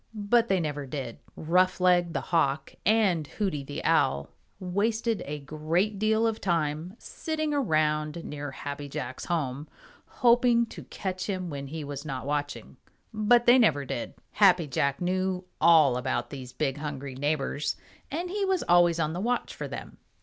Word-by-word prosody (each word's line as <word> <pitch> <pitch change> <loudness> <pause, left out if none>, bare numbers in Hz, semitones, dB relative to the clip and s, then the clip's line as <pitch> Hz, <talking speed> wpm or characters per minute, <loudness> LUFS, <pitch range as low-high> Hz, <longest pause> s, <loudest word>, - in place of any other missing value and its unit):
But 225 +3 +2
they 190 -3 +2
never 145 -4 -3
did. 130 -4 -5 0.2
Roughleg 180 0 +3
the - - -1
Hawk 155 -4 0
and 195 -8 +3
Hooty 185 -8 -2
the 145 +2 -6
Owl 70 - +2 0.3
wasted 215 +4 0
a 150 +1 -3
great 155 +8 -1
deal 220 +1 +2
of 225 -1 -1
time, 165 0 -1
sitting 310 +1 -3
around 155 - 0
near 145 -1 -5
Happy 145 0 -6
Jack's 130 -1 -5
home, 145 -4 -2 0.4
hoping 240 -1 +4
to - - -11
catch 185 -2 -4
him 185 -4 -3
when 140 -1 -5
he 155 +2 -5
was 145 -1 -6
not 135 -4 -5
watching, 145 0 -3 0.4
but 225 +3 +4
they 245 +2 +7
never 145 - +3
did. 120 - -5 0.2
Happy 185 -5 +5
Jack 140 +1 -1
knew 185 0 -1 0.2
all 155 -6 +6
about 125 -1 -2
these 130 -3 -7
big 140 -1 -2
hungry 140 -3 -5
neighbors, 145 +1 -1 0.3
and 345 +5 -3
he 405 +1 -1
was 380 -2 +1
always 175 -1 +4
on 155 -1 0
the 180 - -3
watch 245 +3 -1
for - - -5
them. - - -8
165 Hz, 160 wpm, -27 LUFS, 145-205 Hz, 0.4 s, they